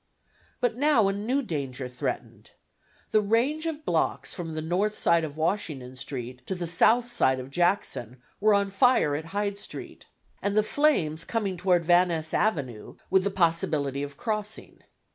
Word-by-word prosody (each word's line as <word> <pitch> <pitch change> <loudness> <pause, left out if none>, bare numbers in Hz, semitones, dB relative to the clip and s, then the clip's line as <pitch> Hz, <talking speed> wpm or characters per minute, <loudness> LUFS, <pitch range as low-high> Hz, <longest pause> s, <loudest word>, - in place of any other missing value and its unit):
But 245 -2 +1
now 265 -7 +4
a - - 0
new 240 +8 -1
danger 135 - -4
threatened. 125 0 -5 0.6
The 215 - +4
range 250 +10 +1
of 310 -1 -5
blocks - - 0
from 165 -4 -5
the 155 - -2
north 190 +6 0
side 170 -1 +3
of 150 -1 -5
Washington 155 -7 -2
Street 125 -1 -6
to 190 - -2
the 175 -1 -4
south 235 +8 +3
side 130 0 +2
of 130 +1 -8
Jackson 175 - 0 0.2
were 210 0 +4
on 200 -1 +1
fire 200 - +4
at 155 +2 -4
Hyde 200 +3 -2
Street, - - -9 0.3
and 200 +1 -1
the 215 - +5
flames 195 - +1
coming 205 -2 -2
toward 175 -1 +2
Van 175 +2 +5
Ness 160 -2 -2
Avenue, 140 - -1 0.2
with 190 0 +4
the 200 - +1
possibility 165 -6 0
of 145 -1 -6
crossing. 215 -2 -4
180 Hz, 165 wpm, -27 LUFS, 150-215 Hz, 0.6 s, the